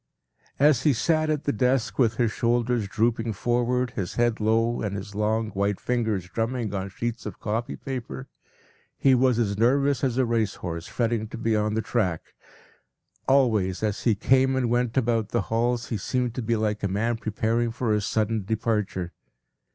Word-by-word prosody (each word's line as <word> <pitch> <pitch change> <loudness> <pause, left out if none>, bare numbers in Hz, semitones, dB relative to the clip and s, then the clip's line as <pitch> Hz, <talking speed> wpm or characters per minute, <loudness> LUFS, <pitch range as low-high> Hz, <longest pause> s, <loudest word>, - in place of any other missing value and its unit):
p> 140 - +3
As 145 -5 +5
he 145 +1 +3
sat 155 +5 +1
at 150 -2 0
the 145 - 0
desk 125 +3 0
with 115 -3 +3
his 120 -2 +1
shoulders 120 -1 0
drooping 115 +2 0
forward, 120 +3 0
his 95 -8 -4
head 120 -1 +1
low, 115 +2 +1
and 100 -2 -2
his 100 +1 -6
long, 110 +1 0
white 100 0 -1
fingers 110 -7 -1
drumming 115 +2 -2
on 95 -1 -2
the - - -7
sheets 120 +4 -4
of - - -8
copy 115 +2 -2
paper, 135 0 -6 0.7
he 135 - +4
was 125 -1 +3
as 100 -3 0
nervous 140 +3 +2
as 130 -2 0
a 130 - +3
race 115 -4 0
horse 85 -1 -5
fretting 115 -2 -1
to - - -8
be 115 -1 0
on 105 0 0
the 110 - 0
track. 95 -8 -2 0.9
Always, 110 -9 +2
as 105 -2 -1
he 115 -3 +2
came 130 +4 +3
and 125 -3 0
went 120 0 0
about 115 -4 +1
the 120 - 0
halls, 120 +1 0
he 115 - -1
seemed 125 +3 -2
like 110 -2 0
a 100 - 0
man 110 +5 0
preparing 115 +2 0
for 115 -1 -1
a 105 - +1
sudden 110 +1 0
departure. 105 -4 -2
115 Hz, 180 wpm, -25 LUFS, 105-125 Hz, 0.9 s, As